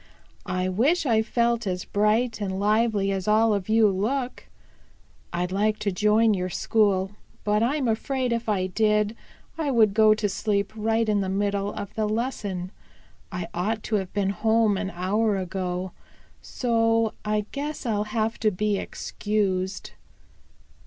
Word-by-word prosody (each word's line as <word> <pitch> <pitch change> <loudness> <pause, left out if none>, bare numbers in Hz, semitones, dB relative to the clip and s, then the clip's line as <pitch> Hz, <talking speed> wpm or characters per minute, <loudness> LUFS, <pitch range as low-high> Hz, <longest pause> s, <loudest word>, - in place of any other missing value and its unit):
"I 185 0 -1
wish 265 - +2
I 225 -4 +3
felt 235 0 0
as 180 -1 -2
bright 215 +2 +1
and 190 -1 -2
lively 210 -1 +2
as 190 -1 -3
all 220 +1 +4
of 200 0 -3
you 220 0 +5
look. 245 +7 -2 0.8
I'd 175 +1 -2
like 210 +2 +1
to 205 - -1
join 210 +3 +3
your 185 -2 -2
school, 195 -1 +1 0.3
but 210 0 +1
I'm 265 +3 +1
afraid 250 +2 0
if 230 -1 -2
I 190 -3 +1
did 210 +2 +1 0.4
I 305 -3 0
would 220 -6 +4
go 215 0 +5
to 215 -1 0
sleep 200 +1 -1
right 225 +1 +1
in 210 -1 +2
the 190 - -2
middle 200 +1 -1
of 205 -1 -6
the 215 -1 -1
lesson. 210 -6 -3 0.6
I 180 -2 -4
ought 210 +5 -2
to 215 - 0
have 190 -2 -4
been 195 -1 0
home 220 +1 +2
an 195 0 -2
hour 200 +4 0
ago. 185 0 -3 0.5
So 225 -2 +1
I 210 -1 0
guess 290 0 -4
I'll 210 -3 0
have 220 +1 -2
to 220 - +3
be 210 +1 0
excused." 195 -3 -2
210 Hz, 155 wpm, -25 LUFS, 195-225 Hz, 0.8 s, you